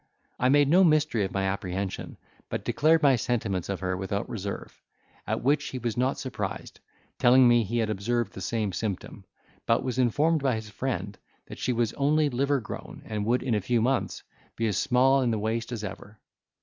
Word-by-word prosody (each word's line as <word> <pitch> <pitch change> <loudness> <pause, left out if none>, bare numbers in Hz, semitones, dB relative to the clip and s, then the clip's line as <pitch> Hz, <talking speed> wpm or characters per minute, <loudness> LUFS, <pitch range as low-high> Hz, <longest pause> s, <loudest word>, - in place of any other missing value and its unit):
I 125 - +3
made 145 +1 +5
no 180 +6 +5
mystery 150 - +3
of 95 - -5
my 95 - -1
apprehension, 95 0 -3 0.3
but - - -4
declared 160 +1 +3
my 140 -2 +6
sentiments 110 -7 -2
of 100 -1 -3
her 95 0 -1
without 95 +2 -3
reserve; 100 -2 -6 0.5
at - - -2
which 145 +4 +2
he 130 - -5
was 120 -3 -3
not 130 +2 0
surprised, 110 -7 -5 0.4
telling 125 +1 +6
me 120 -1 +5
he 115 +4 -3
had 110 -2 +1
observed 115 +4 -1
the 95 - -8
same 105 0 -1
symptom, 100 -1 -4 0.4
but 115 - +2
was 130 -1 -2
informed 150 +6 +2
by 135 -3 +1
his 110 -1 -6
friend 105 -4 -4 0.3
that - - -10
she - - 0
was 120 -2 0
only 150 +1 +2
livergrown 135 -1 -2
and 105 -1 -3
would 125 +2 +2
in 115 -5 0
few 120 +5 +1
months 130 +4 0 0.3
be 115 - -1
as 105 -3 0
small 135 +2 +3
in 125 - +1
the 110 - 0
waist 115 +2 -2
as 115 -3 -4
ever. 100 +1 -8
115 Hz, 190 wpm, -27 LUFS, 105-130 Hz, 0.5 s, my